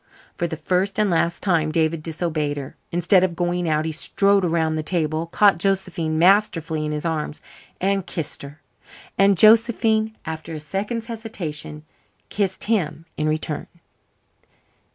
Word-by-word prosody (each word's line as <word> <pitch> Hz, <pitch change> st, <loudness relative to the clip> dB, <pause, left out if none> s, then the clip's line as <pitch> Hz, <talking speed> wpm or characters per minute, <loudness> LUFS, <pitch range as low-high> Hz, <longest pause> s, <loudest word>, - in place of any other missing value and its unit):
For 170 Hz, -, -1 dB
the 160 Hz, -, -5 dB
first 185 Hz, +4 st, 0 dB
and 210 Hz, -3 st, +2 dB
last 170 Hz, 0 st, 0 dB
time 165 Hz, -5 st, +2 dB
David 160 Hz, 0 st, +1 dB
disobeyed 155 Hz, -2 st, -2 dB
her. 135 Hz, -2 st, -7 dB, 0.2 s
Instead 180 Hz, +2 st, +3 dB
of 180 Hz, -2 st, 0 dB
going 175 Hz, 0 st, -1 dB
out, 155 Hz, 0 st, +1 dB
he 160 Hz, -, -1 dB
strode 200 Hz, +5 st, +2 dB
around 165 Hz, -2 st, +1 dB
the 155 Hz, -, -1 dB
table, 160 Hz, -1 st, -1 dB
caught 195 Hz, 0 st, +4 dB
Josephine 180 Hz, -4 st, 0 dB
masterfully 165 Hz, -4 st, +3 dB
in -, -, -3 dB
his 150 Hz, +2 st, -4 dB
arms, 155 Hz, -2 st, -2 dB, 0.4 s
and 195 Hz, 0 st, 0 dB
kissed 160 Hz, -5 st, -4 dB
her. 140 Hz, +2 st, -10 dB, 0.6 s
And 195 Hz, -1 st, +4 dB
Josephine, 220 Hz, 0 st, +4 dB
after 160 Hz, 0 st, -6 dB
a -, -, -5 dB
second's 205 Hz, +9 st, -3 dB
hesitation, 180 Hz, -, -6 dB, 0.5 s
kissed 195 Hz, -2 st, -1 dB
him 165 Hz, -8 st, -1 dB
in 155 Hz, 0 st, 0 dB
return. 155 Hz, -1 st, -3 dB
170 Hz, 150 wpm, -22 LUFS, 155-195 Hz, 0.6 s, caught